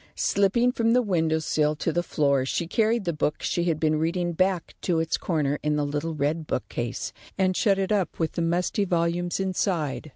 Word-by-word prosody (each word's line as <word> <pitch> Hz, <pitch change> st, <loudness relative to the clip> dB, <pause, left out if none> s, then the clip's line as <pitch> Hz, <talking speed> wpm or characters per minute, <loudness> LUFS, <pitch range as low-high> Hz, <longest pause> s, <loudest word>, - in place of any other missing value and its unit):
Slipping 205 Hz, +5 st, +2 dB
from 230 Hz, -2 st, +1 dB
the 250 Hz, -, +4 dB
window 165 Hz, -6 st, +1 dB
sill 155 Hz, -1 st, +1 dB
to 160 Hz, +1 st, -2 dB
the 175 Hz, -, +1 dB
floor, 140 Hz, -5 st, +1 dB
she 150 Hz, +6 st, -1 dB
carried 225 Hz, +4 st, +1 dB
the 170 Hz, -, 0 dB
book 150 Hz, 0 st, -1 dB
she 175 Hz, -, 0 dB
had 165 Hz, -3 st, 0 dB
been 155 Hz, -1 st, +1 dB
reading 175 Hz, +2 st, 0 dB
back 185 Hz, 0 st, 0 dB
to 170 Hz, -3 st, +1 dB
its 160 Hz, 0 st, 0 dB
corner 150 Hz, -4 st, -1 dB
in 150 Hz, 0 st, 0 dB
the 150 Hz, -1 st, 0 dB
little 150 Hz, +3 st, -3 dB
red 150 Hz, +2 st, -1 dB
bookcase, 120 Hz, -2 st, -3 dB, 0.2 s
and 185 Hz, -1 st, +2 dB
shut 200 Hz, -2 st, +3 dB
it 195 Hz, +1 st, -1 dB
up 200 Hz, -4 st, 0 dB
with 160 Hz, -1 st, -1 dB
the 170 Hz, -, -3 dB
musty 175 Hz, +5 st, 0 dB
volumes 175 Hz, 0 st, 0 dB
inside. 180 Hz, -6 st, -1 dB
170 Hz, 200 wpm, -26 LUFS, 155-190 Hz, 0.2 s, the